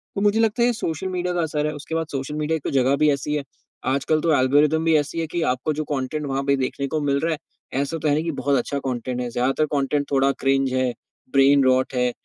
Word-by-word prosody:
तो 200 Hz, -, -1 dB
मुझे 205 Hz, +2 st, +3 dB
लगता 225 Hz, +1 st, +2 dB
है -, -, +5 dB
ये 245 Hz, -, +2 dB
सोशल 180 Hz, -4 st, -3 dB
मीडिया 180 Hz, -1 st, -2 dB
का 175 Hz, -, 0 dB
असर 150 Hz, -2 st, -1 dB
है 150 Hz, -, -3 dB
उसके 150 Hz, +2 st, -6 dB
बाद 165 Hz, -1 st, -1 dB
सोशल 135 Hz, +1 st, -4 dB
मीडिया 155 Hz, +1 st, 0 dB
एक 150 Hz, -, -13 dB
तो -, -, -2 dB
जगह 135 Hz, 0 st, +3 dB
भी 150 Hz, +1 st, +4 dB
ऐसी 150 Hz, +2 st, -2 dB
है। 145 Hz, -, -2 dB, 0.4 s
आजकल 140 Hz, +4 st, +1 dB
तो 165 Hz, -1 st, +2 dB
एल्गोरिदम 145 Hz, +4 st, +3 dB
भी 165 Hz, -1 st, +4 dB
ऐसी 150 Hz, +2 st, -2 dB
है 165 Hz, -, -1 dB
कि 170 Hz, +2 st, -3 dB
आपको 130 Hz, +5 st, -2 dB
जो 155 Hz, +1 st, -2 dB
कॉन्टेन्ट 145 Hz, +3 st, -3 dB
वहाँ 135 Hz, 0 st, -1 dB
पे 140 Hz, 0 st, +2 dB
देखने 140 Hz, +1 st, -2 dB
को 155 Hz, +2 st, -2 dB
मिल 140 Hz, -1 st, +1 dB
रहा 165 Hz, +3 st, 0 dB
है, 155 Hz, -, -4 dB, 0.4 s
ऐसा 145 Hz, +4 st, -2 dB
तो 155 Hz, -, -2 dB
है 145 Hz, -, +3 dB
नहीं 155 Hz, -, 0 dB
कि 165 Hz, -, -1 dB
बहुत 140 Hz, +1 st, +2 dB
अच्छा 140 Hz, +3 st, -2 dB
कॉन्टेन्ट 125 Hz, -1 st, -3 dB
है। 125 Hz, -, -3 dB
ज़्यादातर 130 Hz, +5 st, +1 dB
कॉन्टेन्ट 140 Hz, +1 st, 0 dB
थोड़ा 135 Hz, 0 st, +3 dB
क्रिंज 135 Hz, -1 st, +2 dB
है, 130 Hz, -1 st, +1 dB, 0.4 s
ब्रेन-रोट 135 Hz, -1 st, +4 dB
है 125 Hz, 0 st, +2 dB
145 Hz, 260 wpm, -23 LUFS, 135-160 Hz, 0.4 s, है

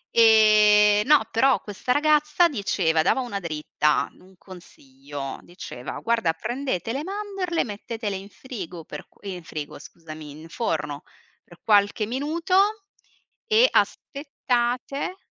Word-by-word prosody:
E, 210 Hz, -2 st, +6 dB
no, 295 Hz, -6 st, +5 dB
però 260 Hz, +3 st, +3 dB
questa 210 Hz, +4 st, -4 dB
ragazza 300 Hz, +4 st, +3 dB
diceva 195 Hz, -, 0 dB
dava 260 Hz, -, +2 dB
una 235 Hz, -6 st, -4 dB
dritta, 150 Hz, -3 st, 0 dB
un 190 Hz, +1 st, -20 dB
consiglio. 140 Hz, -7 st, -10 dB
Diceva: 175 Hz, -8 st, -8 dB
"Guarda, 230 Hz, -8 st, +1 dB
prendete 240 Hz, -1 st, -3 dB
le 275 Hz, -, -2 dB
mandorle, 390 Hz, -2 st, -2 dB
mettetele 215 Hz, -1 st, -5 dB
in 195 Hz, +1 st, -8 dB
frigo 185 Hz, -, -8 dB
per", 150 Hz, -, -9 dB
eh, 195 Hz, -2 st, -6 dB
in 180 Hz, -1 st, -9 dB
frigo, 150 Hz, -3 st, -7 dB
scusami, 155 Hz, -1 st, -11 dB
"in 155 Hz, +3 st, -12 dB
forno 150 Hz, -8 st, -3 dB, 0.4 s
per 175 Hz, -, -18 dB
qualche 205 Hz, 0 st, +3 dB
minuto 340 Hz, -, 0 dB, 0.6 s
e 455 Hz, +2 st, +5 dB
aspettate", 275 Hz, +2 st, -1 dB
215 Hz, 120 wpm, -24 LUFS, 170-275 Hz, 0.6 s, E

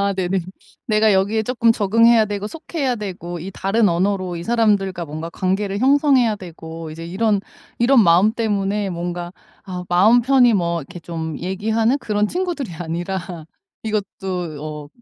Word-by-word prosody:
네네. 190 Hz, 0 st, 0 dB, 0.5 s
내가 215 Hz, -1 st, +3 dB
여기에 200 Hz, +3 st, +2 dB
쪼끔 230 Hz, 0 st, +2 dB
적응해야 225 Hz, +2 st, +4 dB
되고 205 Hz, -1 st, -4 dB
속해야 280 Hz, 0 st, -3 dB
되고 180 Hz, -5 st, -6 dB
이 180 Hz, +4 st, -6 dB
다른 200 Hz, +3 st, +1 dB
언어로 185 Hz, +1 st, 0 dB
이 170 Hz, -, -5 dB
사람들과 200 Hz, -5 st, +1 dB
뭔가 160 Hz, +2 st, -6 dB
관계를 195 Hz, +2 st, -1 dB
형성해야 265 Hz, -3 st, +4 dB
되고 165 Hz, -3 st, -9 dB
이제 165 Hz, +2 st, -8 dB
이런 205 Hz, +3 st, +1 dB, 0.4 s
이런 240 Hz, 0 st, +5 dB
마음 180 Hz, +4 st, +5 dB
때문에 205 Hz, -3 st, -1 dB
뭔가 175 Hz, 0 st, -5 dB, 0.3 s
아 180 Hz, -2 st, -6 dB
마음 210 Hz, +7 st, +5 dB
편히 250 Hz, -1 st, +4 dB
뭐 170 Hz, -3 st, 0 dB
이렇게 165 Hz, +5 st, -10 dB
좀 160 Hz, -2 st, -5 dB
얘기하는 220 Hz, +7 st, 0 dB
그런 210 Hz, -5 st, 0 dB
친구들이 340 Hz, -, -3 dB
아니라 175 Hz, +3 st, -3 dB, 0.6 s
이것도 190 Hz, -7 st, -4 dB
어 150 Hz, -1 st, -6 dB
195 Hz, 330 characters per minute, -20 LUFS, 175-225 Hz, 0.6 s, 이런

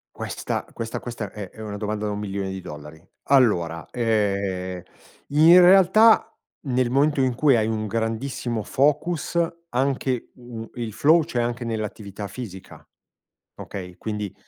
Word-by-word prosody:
Questa -, -, -4 dB
questa 115 Hz, 0 st, -5 dB
questa 115 Hz, -4 st, -5 dB
è 100 Hz, -3 st, -8 dB
è -, -, -18 dB
una 105 Hz, -2 st, -5 dB
domanda 105 Hz, 0 st, -3 dB
da 105 Hz, -, -1 dB
$1.000.000.000. 95 Hz, -6 st, -6 dB, 0.2 s
Allora, 90 Hz, -12 st, +2 dB
ehm, 100 Hz, -6 st, -1 dB, 0.5 s
in 165 Hz, +5 st, +7 dB
realtà 195 Hz, +5 st, +6 dB, 0.3 s
nel 125 Hz, -1 st, +1 dB
momento 145 Hz, +3 st, +2 dB
in 130 Hz, -2 st, +1 dB
cui 135 Hz, -2 st, +4 dB
hai 110 Hz, 0 st, +1 dB
un 110 Hz, -1 st, -2 dB
grandissimo 115 Hz, +1 st, -2 dB
focus 150 Hz, +4 st, 0 dB, 0.3 s
anche, 130 Hz, -2 st, -1 dB
mhmm, 120 Hz, -2 st, -9 dB
il 115 Hz, -4 st, -4 dB
flow, 160 Hz, +3 st, +4 dB
c'è 125 Hz, -7 st, -1 dB
anche 120 Hz, 0 st, -3 dB
nell'attività 105 Hz, -2 st, -5 dB
fisica, 100 Hz, -7 st, -10 dB, 0.7 s
okay? 90 Hz, -2 st, -8 dB
Quindi 105 Hz, -2 st, -4 dB
115 Hz, 130 wpm, -23 LUFS, 100-130 Hz, 0.7 s, in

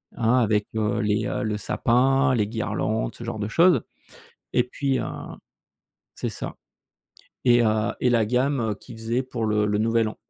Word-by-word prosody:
hein, 120 Hz, +2 st, +2 dB
avec, 105 Hz, -2 st, +1 dB
heu, 110 Hz, +1 st, 0 dB
les 105 Hz, 0 st, 0 dB
heu, -, -, -2 dB
le 105 Hz, -1 st, -1 dB
sapin, 130 Hz, +5 st, +2 dB
les 105 Hz, -3 st, +1 dB
guirlandes, 110 Hz, 0 st, -2 dB
ce 120 Hz, -, -9 dB
genre 115 Hz, -2 st, -4 dB
de 105 Hz, -, -2 dB
choses. 170 Hz, -2 st, +4 dB, 0.7 s
Et 125 Hz, -, +3 dB
puis, 135 Hz, +1 st, -1 dB
heu -, -, -2 dB, 1.1 s
c'est -, -, -3 dB
ça. -, -, -6 dB, 0.9 s
Et 120 Hz, -1 st, +5 dB
heu 110 Hz, 0 st, +1 dB
et 125 Hz, -, +3 dB
la 115 Hz, -3 st, +3 dB
gamme 125 Hz, -2 st, +1 dB
qui -, -, -11 dB
faisait 115 Hz, +3 st, -1 dB
pour 125 Hz, -3 st, -4 dB
le 105 Hz, -1 st, +2 dB
le 105 Hz, 0 st, 0 dB
Nouvel 115 Hz, 0 st, +2 dB
An. -, -, -8 dB
115 Hz, 175 wpm, -24 LUFS, 110-125 Hz, 1.1 s, Et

